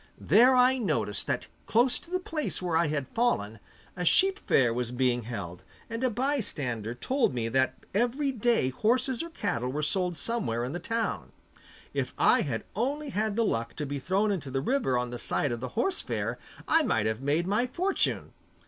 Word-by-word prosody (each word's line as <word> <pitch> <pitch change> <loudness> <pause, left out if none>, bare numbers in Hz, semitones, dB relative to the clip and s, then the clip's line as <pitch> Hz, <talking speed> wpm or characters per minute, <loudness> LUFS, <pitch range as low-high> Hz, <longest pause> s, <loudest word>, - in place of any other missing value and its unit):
There 250 +3 +5
I 255 +1 +5
noticed 105 - -1
that - - -1 0.2
close 240 +3 +3
to - - -16
the 365 +1 0
place 320 -4 -3
where 175 -3 -2
I 165 0 +3
had 145 -3 -2
fallen, 115 - 0 0.4
a 180 - -3
sheep 385 - +4
fair 120 -4 +3
was 120 0 -2
being 125 -2 0
held, 95 -7 -6 0.3
and 230 +2 -3
a 255 - +3
bystander 170 - -2
told 245 - 0
me 115 -2 -1
that 130 +2 +1 0.2
every 245 +7 +1
day 235 - +1
horses 235 - +1
or 335 - -5
cattle 180 - -2
were 150 +3 -2
sold 180 +2 0
somewhere 145 - -1
in 125 +4 -4
the 175 - -3
town. 225 +5 -2 0.6
If - - -2
I - - +5
had - - -3
only 290 +4 -1
had 215 -3 -1
the 230 0 +2
luck 115 - -2
to 150 - -3
be 140 0 -4
thrown 195 +9 +1
into 160 -9 -3
the 135 +1 -1
river 145 - +1
on 125 0 -2
the 120 - -5
side 145 - 0
of 120 - -3
the 130 +1 -5
horse 365 +10 +1
fair - - -3 0.3
I 325 - +5
might 115 - +1
have 110 +2 -1
made 145 +5 +1
my 210 +6 +1
fortune! 365 +9 -1
180 Hz, 195 wpm, -28 LUFS, -, 0.6 s, There